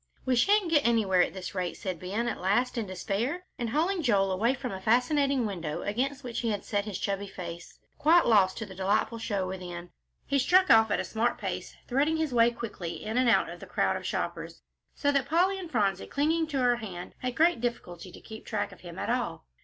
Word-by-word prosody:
"We 260 - +2
shan't 395 - +3
get 295 -3 +4
anywhere 210 -6 +3
at - - 0
this 185 -1 -6
rate," 180 -3 -3
said 185 -4 -4
Ben, 205 +7 -2
at - - -3
last, 210 +7 +1
in 230 -4 -2
despair, 220 - -2
and, 235 -2 -2
hauling 340 - +1
Joel 200 -8 +2
away 225 +8 +1
from 255 -2 -5
a 190 -1 -6
fascinating 255 +4 +2
window 170 -7 -4
against 265 +6 -2
which 240 -2 -4
he 235 - -1
had 205 -2 -3
set 205 -1 -1
his 210 -4 -4
chubby 200 0 -2
face, 170 -3 -8 0.2
quite 335 +3 +5
lost 200 -5 +4
to 220 - -4
the 195 - -10
delightful 205 +4 0
show 200 -4 -2
within, 180 -2 -7 0.3
he 280 0 +1
struck 365 +7 +4
off 220 -1 +7
at - - +1
a - - 0
smart 235 +2 0
pace, - - -5
threading 290 +5 +1
his 315 -4 -1
way 235 -1 +5
quickly 210 -8 -6
in 220 +1 -3
and 250 -1 +3
out 230 - +4
of - - -8
the - - -10
crowd - - +1
of - - -5
shoppers, - - -4 0.3
so 285 - +1
that 275 -1 0
Polly 370 +5 +2
and 355 -3 -7
Phronsie, 200 - 0
clinging 320 +3 +1
to 290 -3 -3
her 245 -2 +3
hand, 185 -6 -7
had 250 -1 -3
great 320 -5 +3
difficulty 185 -7 -4
to - - -12
keep 220 -1 -10
track 205 -2 -2
of 180 - -15
him 170 -2 -10
at - - -2
all. - - -2
230 Hz, 225 wpm, -28 LUFS, 195-275 Hz, 0.3 s, off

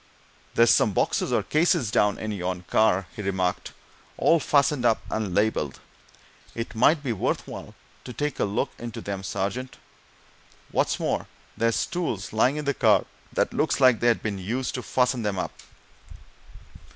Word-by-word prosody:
"There's 115 0 +6
some 105 - +3
boxes, - - 0
or - - +2
cases, 155 - +2
down 105 -1 +2
in 110 - -4
yon 90 -2 -3
car," 95 0 +2
he - - -5
remarked. 95 -2 -1 0.5
"All 165 - +4
fastened 140 -2 +2
up 115 -2 +3
and 105 -5 -2
labelled 105 -10 0 0.8
it 115 0 -4
might 145 +7 +3
be 125 -4 -1
worth 100 - -2
while - - -9 0.3
to 125 - -6
take 145 +2 -3
a - - +2
look 105 +7 -1
into 120 -1 -6
them, 100 -1 -5
sergeant. 100 +6 -3 0.9
What's - - +1
more, - - -1 0.3
there's 115 0 +1
tools 120 - -3
lying 125 +6 +3
in 150 - -4
the 140 - +1
car - - +3 0.3
that - - 0
looks - - +1
like 130 -4 +5
they'd 120 -1 +2
been 105 -3 -2
used 120 +8 -3
to 125 - -3
fasten 125 0 +1
them 105 -3 -2
up." - - -3
115 Hz, 165 wpm, -25 LUFS, 100-130 Hz, 0.9 s, There's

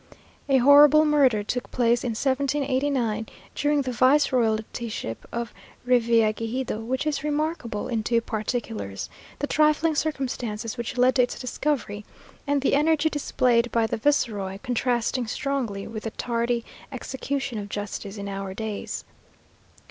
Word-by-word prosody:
A 270 - +5
horrible 290 +4 +7
murder 270 -8 +3
took 250 +4 -3
place 240 -1 +2
in 240 -3 -1
1789, 265 -3 0 0.3
during 290 -1 +1
the 255 - -3
vice 260 +4 +4
royaltyship 220 - -1
of 235 -1 -4 0.3
Revillagigedo, 230 -1 +1
which 260 +5 -2
is 300 -2 -1
remarkable 300 -7 -2
in 230 -3 -1
two 230 +2 +2
particulars; 205 - -4 0.3
the 290 - -1
trifling 305 +2 +3
circumstances 250 -7 -2
which 235 0 -5
led 250 +1 +5
to - - +6
its 245 - -1
discovery, 245 -5 -2 0.4
and 285 0 +2
the - - +2
energy 310 +2 +3
displayed 245 -5 +1
by 230 -1 +2
the 220 - -2
viceroy, 215 -7 0
contrasting 245 0 0
strongly 240 -6 -2
with 215 -1 -6
the 225 - -3
tardy 235 +1 -1 0.3
execution 265 -1 -3
of 205 0 -7
justice 205 0 -5
in 200 0 -5
our 195 -1 -5
days. 220 -1 -5
245 Hz, 135 wpm, -25 LUFS, 220-280 Hz, 0.4 s, horrible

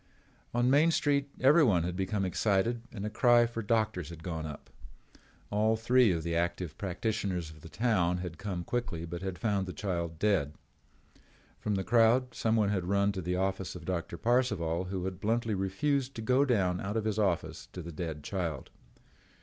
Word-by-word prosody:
On 120 +1 +1
Main 145 +5 +5
Street 145 -3 +1
everyone 130 - +5
had 90 +1 -3
become 95 +1 -1
excited 105 +5 +1
and 105 -3 -5
a - - -1
cry 120 +1 +5
for 115 -1 -4
doctors 110 -6 0
had 80 -1 -10
gone 80 -3 -4
up. 75 -1 -10 0.8
All 110 +2 +2
three 120 0 +4
of 85 -2 -1
the 85 0 -2
active 85 -1 -1
practitioners 95 -3 -2
of 80 -1 -15
the 80 - -11
town 90 -7 +1
had 90 -3 -6
come 95 -4 -4
quickly 105 -8 -3
but 85 +1 -6
had 95 -2 -4
found 100 -4 0
the 90 - -5
child 85 -2 -3
dead. 80 -7 +1 1.0
From 105 - -1
the 95 - -1
crowd 120 +3 +3
someone 110 -2 +1
had 95 -4 -1
run 100 +2 +2
to 95 -2 -4
the 90 +1 -1
office 95 0 -2
of 85 -2 -9
Doctor 90 -1 -3
Parcival 105 -9 +1
who 95 -1 -3
had 95 -1 -4
bluntly 115 +1 0
refused 130 +8 -1
to 115 - -5
go 130 +4 +3
down 95 -8 +1
out 105 +3 -2
of 110 - -1
his 110 -1 0
office 95 -5 -1
to 90 - -7
the 85 - -7
dead 80 -2 -5
child. 85 -8 -3
100 Hz, 185 wpm, -30 LUFS, 90-115 Hz, 1.0 s, Main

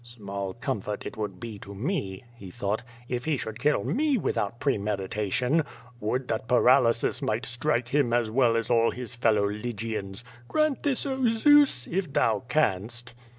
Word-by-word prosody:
"Small 100 -5 -6
comfort 105 -3 -4
it - - -6
would 105 -4 -5
be 110 -3 -7
to 100 +1 -10
me/' 100 - -3
he 100 -5 -10
thought, 100 +4 -2 0.3
"if 125 0 -3
he 155 -3 +1
should 110 -1 -6
kill 150 +3 +2
me 290 +1 +1
without 115 - -2
premeditation. 105 - 0 0.4
Would 125 +5 -2
that 110 0 -2
paralysis 125 -1 +3
might 110 +3 -1
strike 120 0 0
him 140 -3 +2
as 120 -2 +1
well 120 -1 +3
as 115 +1 -2
all 115 -1 +4
his 125 -1 -6
fellow 110 -4 +2
Lygians. 105 -1 -4 0.2
Grant 305 -3 +1
this, 285 -2 0
oh 265 -3 +1
Zeus! 275 - +5
if 180 -3 -2
thou 110 -6 +2
canst." 120 -3 -1
120 Hz, 160 wpm, -27 LUFS, 105-140 Hz, 0.4 s, Zeus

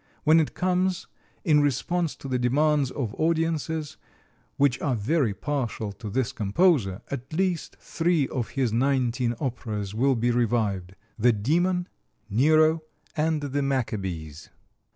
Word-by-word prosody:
When 160 +1 +6
it 155 - -1
comes, 185 0 0 0.4
in 150 -4 +4
response 155 +4 0
to - - -9
the 130 -1 -1
demands 145 +2 +2
of 120 -6 -4
audiences, 160 -1 -1 0.6
which 140 -2 +2
are 130 - +1
very 125 +3 +1
partial 120 -7 -3
to 105 +1 -8
this 130 +4 -1
composer, 110 - +1
at 130 0 -6
least 180 0 -1
three 165 -4 0
of 120 -4 -3
his 125 -5 +1
nineteen 125 -1 +1
operas 110 -6 -3
will 130 +4 +2
be 120 +1 +1
revived: 105 -6 0 0.2
"The 120 +2 +5
Demon," 175 - +1 0.4
"Nero," 155 +7 +4 0.3
and 155 0 +1
"The 145 0 -2
Maccabees." 95 - -3
135 Hz, 130 wpm, -26 LUFS, 115-155 Hz, 0.6 s, When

